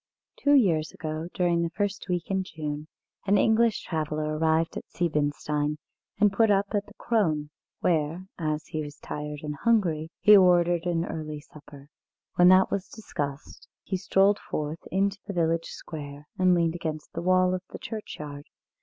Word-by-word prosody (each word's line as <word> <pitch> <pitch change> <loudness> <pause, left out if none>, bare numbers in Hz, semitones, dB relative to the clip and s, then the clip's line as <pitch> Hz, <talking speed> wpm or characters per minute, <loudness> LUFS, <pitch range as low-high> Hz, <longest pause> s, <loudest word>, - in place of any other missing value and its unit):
Two 285 0 +3
years 165 - +3
ago, 155 0 -4
during 175 -2 +2
the 170 - 0
first 205 +3 -3
week 175 +1 -2
in 190 -1 +1
June, 150 -3 -5 0.4
an 200 +1 +5
English 225 +2 +3
traveller 155 -1 -2
arrived 160 +1 +1
at - - -7
Siebenstein 150 -2 -1 0.4
and 205 -2 +4
put 225 +2 +4
up 200 0 +3
at 205 -1 0
the 210 - -16
"Krone," 155 -10 0 0.3
where, 165 +2 0
as 155 -1 -2
he 155 - -4
was 145 -1 -7
tired 150 0 -6
and 150 -1 -4
hungry, 170 -7 +1
he 210 - +8
ordered 175 -2 +4
an 170 -1 0
early 155 -3 -5
supper. 145 -1 -15 0.4
When 180 - +5
that 185 +1 +6
was 200 -1 -2
discussed, 145 -10 -6 0.2
he 190 - -3
strolled 195 +2 +3
forth 155 +2 -4
into 195 +1 +1
the 200 - -4
village 165 -1 +1
square, 145 -2 -8
and 185 -1 +4
leaned 165 -1 +2
against 160 -3 -5
the - - -3
wall 185 +1 +3
of 185 - -2
the - - -7
churchyard. 150 -10 -7
165 Hz, 165 wpm, -27 LUFS, 150-190 Hz, 0.4 s, he